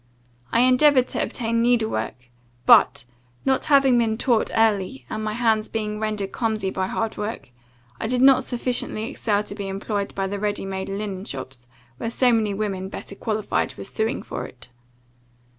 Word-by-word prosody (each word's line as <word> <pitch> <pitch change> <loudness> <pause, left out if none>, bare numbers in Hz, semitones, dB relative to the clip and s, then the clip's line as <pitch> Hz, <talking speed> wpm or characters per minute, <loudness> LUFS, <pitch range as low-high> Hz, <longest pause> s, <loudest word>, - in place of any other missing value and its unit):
I 230 - +4
endeavoured 255 +1 +5
to - - -1
obtain 230 -1 -1
needlework; 220 - 0 0.3
but, 120 - +6 0.4
not 265 -1 +2
having 275 -4 +5
been 220 -2 +1
taught 235 -2 +1
early, 200 - +1
and 215 - -3
my 215 0 -2
hands 220 -2 +1
being 210 -1 -3
rendered 210 -3 -2
clumsy 220 -5 -1
by 190 0 -1
hard 225 +2 -2
work, 210 - -5 0.5
I - - -2
did 250 +2 +1
not 270 -1 +6
sufficiently 245 -3 -1
excel 210 -6 0
to 205 - -8
be 200 -1 -5
employed 200 +1 -3
by 195 - -1
the 200 +1 -3
ready 205 -1 -2
made 190 0 -4
linen 195 -1 -4
shops, 130 - -7 0.3
when 230 - -3
so 245 +1 +3
many 220 -2 +2
women, 195 -2 -3
better 200 - -8
qualified, 215 +1 -2
were - - -6
suing 220 +4 -2
for - - -5
it. 125 - -15
215 Hz, 170 wpm, -23 LUFS, 195-235 Hz, 0.5 s, but